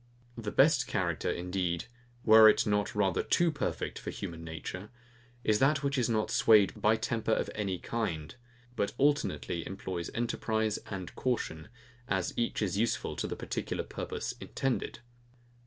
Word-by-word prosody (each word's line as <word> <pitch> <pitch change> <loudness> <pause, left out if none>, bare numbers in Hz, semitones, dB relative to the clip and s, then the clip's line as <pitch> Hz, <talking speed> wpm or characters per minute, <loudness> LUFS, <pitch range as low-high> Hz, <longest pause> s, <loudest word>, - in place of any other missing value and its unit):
The 110 -3 -4
best - - +4
character, - - -1
indeed, 90 -1 -1 0.4
were 110 0 +9
it - - +3
not 105 0 0
rather 95 -4 +2
too 170 -1 +2
perfect 145 -3 -3
for - - -6
human 85 -1 -6
nature, 80 +5 -6 0.5
is 105 -1 +3
that 140 +2 +3
which 140 0 0
is 125 -3 +1
not 110 -2 0
swayed 105 -4 +5
by 110 +1 +4
temper 110 0 -2
of - - -1
any 100 -3 -2
kind; 85 -8 -3 0.4
but 100 - -1
alternately 140 - +1
employs 90 -2 -5
enterprise 110 -2 0
and 95 -3 -5
caution, 95 -11 -2 0.4
as 95 -5 0
each 115 -2 0
is 100 0 -1
useful 115 +1 0
to - - -2
the - - -4
particular - - -3
purpose - - -4
intended. 130 -3 -2
105 Hz, 150 wpm, -31 LUFS, 90-115 Hz, 0.5 s, were